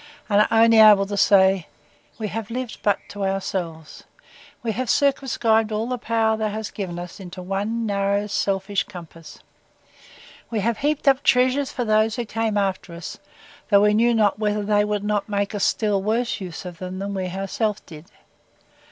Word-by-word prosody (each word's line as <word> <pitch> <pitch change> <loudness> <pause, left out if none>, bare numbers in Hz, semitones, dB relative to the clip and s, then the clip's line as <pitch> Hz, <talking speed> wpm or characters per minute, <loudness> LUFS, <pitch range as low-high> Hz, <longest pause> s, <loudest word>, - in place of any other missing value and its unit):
and 205 0 +4
are - - +3 0.2
able 220 -2 +8
only - - +1
to 205 +1 -4
say, 190 -2 +4 0.5
We 215 -2 -4
have 220 +1 -5
lived 250 0 -5
but 205 -2 +2
to 205 -1 -5
ourselves: 180 -5 -4 0.6
We 230 - -1
have 250 +3 -3
circumscribed 235 -6 +2
all 215 +1 -1
the 250 0 -3
power 225 -1 +1
thou 220 -1 -1
hast 215 0 -5
given 185 -4 -5
us 175 +2 -8
into 185 -1 -9
one 205 +5 -2
narrow, 200 0 0
selfish, 195 -1 -1
compass: 170 -4 -12 1.1
We 225 -3 -2
have 230 +2 -1
heaped 295 0 -1
up 270 0 +5
treasures 260 +2 +2
for 245 -3 -3
those 215 0 +2
who 240 - -3
came 225 -1 -2
after 190 -3 -2
us, 170 0 -8 0.5
though 200 -1 +5
we 210 0 +4
knew 235 +2 +3
not 210 -2 +2
whether 210 -1 0
they 205 0 +2
would 210 -1 -2
not 210 0 -1
make 200 0 -1
a 205 - -3
still 205 -1 +1
worse 225 +2 -1
use 180 -1 -7
of 175 -2 -8
them 185 0 -6
than 200 +1 -4
we 190 -1 -3
ourselves 195 +3 -2
did! 155 0 -13
210 Hz, 180 wpm, -22 LUFS, 195-225 Hz, 1.1 s, able